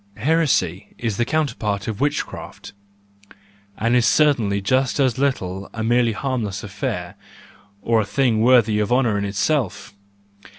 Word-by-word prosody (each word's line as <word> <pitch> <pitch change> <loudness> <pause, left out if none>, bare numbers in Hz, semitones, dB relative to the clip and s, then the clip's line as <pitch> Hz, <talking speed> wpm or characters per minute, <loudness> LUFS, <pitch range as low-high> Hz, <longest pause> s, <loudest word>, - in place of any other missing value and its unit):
Heresy 110 - 0
is 115 -4 -3
the 120 - +1
counterpart 115 -9 -2
of 110 0 -4
witchcraft, 145 -7 -4 1.0
and 115 +2 +1
is 120 -2 +3
certainly 120 -9 +2
just 130 +7 0
as 130 -2 +1
little 95 -9 -2
a 110 - -3
merely 120 0 +2
harmless 110 -6 -3
affair, 100 - -4 0.7
or 115 -1 +2
a - - -1
thing 115 +1 +1
worthy 115 -3 +4
of 105 +2 -1
honour 120 -5 +2
in 100 - -2
itself. 105 - -1
115 Hz, 135 wpm, -21 LUFS, 105-130 Hz, 1.0 s, worthy